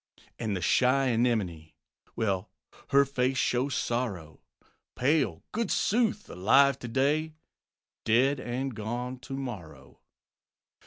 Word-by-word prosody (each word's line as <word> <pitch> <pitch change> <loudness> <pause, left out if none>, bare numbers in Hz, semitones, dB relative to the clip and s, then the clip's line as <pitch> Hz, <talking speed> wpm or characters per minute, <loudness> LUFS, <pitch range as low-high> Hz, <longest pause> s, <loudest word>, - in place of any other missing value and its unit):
And 110 -4 -1
the - - -5
shy 130 +8 +3
Anemone 110 -10 0 0.4
Well, 95 -4 -1 0.4
her 140 0 +5
face 130 -1 0
shows 130 +3 0
sorrow; 100 -11 -3 0.5
Pale, 130 - +1
goodsooth! 220 0 0
alive 135 +8 +3
to 120 - -6
day, 150 +6 0 0.7
Dead 130 +5 +3
and 130 +2 -3
gone 120 +4 -4
to 135 +1 -7
morrow. 110 - -8
125 Hz, 105 wpm, -28 LUFS, 110-135 Hz, 0.7 s, her